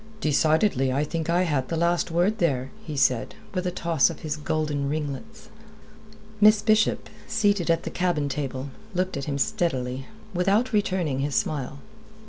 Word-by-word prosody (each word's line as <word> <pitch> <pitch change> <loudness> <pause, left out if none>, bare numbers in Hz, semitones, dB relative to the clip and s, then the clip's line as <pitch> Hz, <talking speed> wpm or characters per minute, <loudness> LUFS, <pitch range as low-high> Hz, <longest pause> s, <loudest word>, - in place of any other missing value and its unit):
"Decidedly 155 -2 +2
I 140 +3 +1
think 160 +1 -3
I 175 +2 +3
had 145 -7 0
the 165 - -1
last 170 +1 +1
word 175 +6 +1
there," 135 -6 0
he 155 -3 -6
said, 125 -3 +2 0.2
with 185 -1 -1
a - - +2
toss 170 -4 +2
of 165 - -8
his 155 -1 -2
golden 150 -2 -1
ringlets. 155 +9 -5 0.9
Miss 215 0 +6
Bishop, 215 0 +2 0.2
seated 205 -5 +1
at 165 0 +2
the - - -5
cabin 175 -5 0
table, 135 -1 -4 0.2
looked 185 +1 0
at 140 -1 -3
him 140 -2 -2
steadily, 135 - -1 0.3
without 195 +7 +2
returning 185 -9 0
his 140 0 -1
smile. 140 -2 -1
160 Hz, 160 wpm, -25 LUFS, 140-185 Hz, 0.9 s, Miss